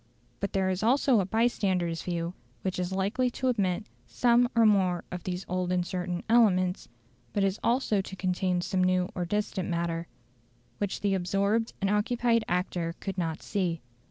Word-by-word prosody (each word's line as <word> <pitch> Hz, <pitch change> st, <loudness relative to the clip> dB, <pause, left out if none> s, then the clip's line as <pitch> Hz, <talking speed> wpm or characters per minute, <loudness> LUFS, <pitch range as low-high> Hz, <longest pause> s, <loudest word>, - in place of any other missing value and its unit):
But 200 Hz, -, -2 dB
there 190 Hz, -1 st, +1 dB
is 185 Hz, +1 st, -2 dB
also 250 Hz, +1 st, +4 dB
a 190 Hz, -, 0 dB
bystander's 190 Hz, -7 st, +1 dB
view 170 Hz, -1 st, -3 dB, 0.3 s
which 185 Hz, -1 st, -2 dB
is 180 Hz, 0 st, -2 dB
likely 205 Hz, +7 st, +1 dB
to 260 Hz, +1 st, -1 dB
omit 200 Hz, -4 st, 0 dB, 0.2 s
some 240 Hz, -1 st, +3 dB
one 245 Hz, -, -4 dB
or 230 Hz, -1 st, +5 dB
more 190 Hz, -4 st, +3 dB
of 180 Hz, -2 st, -5 dB
these 180 Hz, +1 st, -3 dB
old 180 Hz, 0 st, -1 dB
and 180 Hz, -1 st, +1 dB
certain 180 Hz, -1 st, -3 dB
elements, 190 Hz, -6 st, +3 dB, 0.4 s
but 195 Hz, -1 st, +1 dB
also 235 Hz, -4 st, +2 dB
to 190 Hz, -, -8 dB
contain 185 Hz, -1 st, 0 dB
some 185 Hz, 0 st, 0 dB
new 185 Hz, 0 st, +2 dB
or 180 Hz, -, -2 dB
distant 195 Hz, -1 st, -2 dB
matter, 170 Hz, -1 st, -2 dB, 0.7 s
which 205 Hz, -2 st, -2 dB
the 200 Hz, -1 st, +1 dB
absorbed 200 Hz, +5 st, +1 dB
and 195 Hz, -, +1 dB
occupied 230 Hz, +2 st, +2 dB
actor 175 Hz, -2 st, -1 dB
could 195 Hz, -2 st, -4 dB
not 165 Hz, -2 st, -2 dB
see. 180 Hz, -5 st, -1 dB
190 Hz, 170 wpm, -28 LUFS, 180-210 Hz, 0.7 s, or